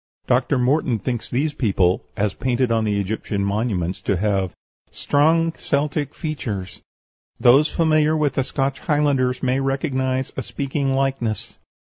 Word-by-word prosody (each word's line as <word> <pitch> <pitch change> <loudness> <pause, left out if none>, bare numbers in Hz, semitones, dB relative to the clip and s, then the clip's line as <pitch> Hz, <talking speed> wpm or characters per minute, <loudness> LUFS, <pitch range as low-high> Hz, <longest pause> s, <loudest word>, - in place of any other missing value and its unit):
Dr. 125 +2 +2
Morton 125 -1 +2
thinks 120 +2 -4
these 145 +5 0
people, 95 -8 +1 0.2
as 100 -2 0
painted 125 -1 0
on 115 -1 +2
the 105 -1 0
Egyptian 100 0 -2
monuments, 100 -4 -1
to 100 - 0
have 95 -2 0 0.4
"strong 165 +3 +2
Celtic 145 -1 -2
features. 110 - -5 0.6
Those 130 +6 +5
familiar 155 -1 +2
with 150 -3 +1
the 135 - +1
Scotch 135 0 -2
Highlanders 145 -5 +1
may 130 +1 +1
recognize 135 -1 -1
a - - -2
speaking 135 0 -2
likeness." 135 -6 -2
130 Hz, 135 wpm, -22 LUFS, 110-145 Hz, 0.6 s, Those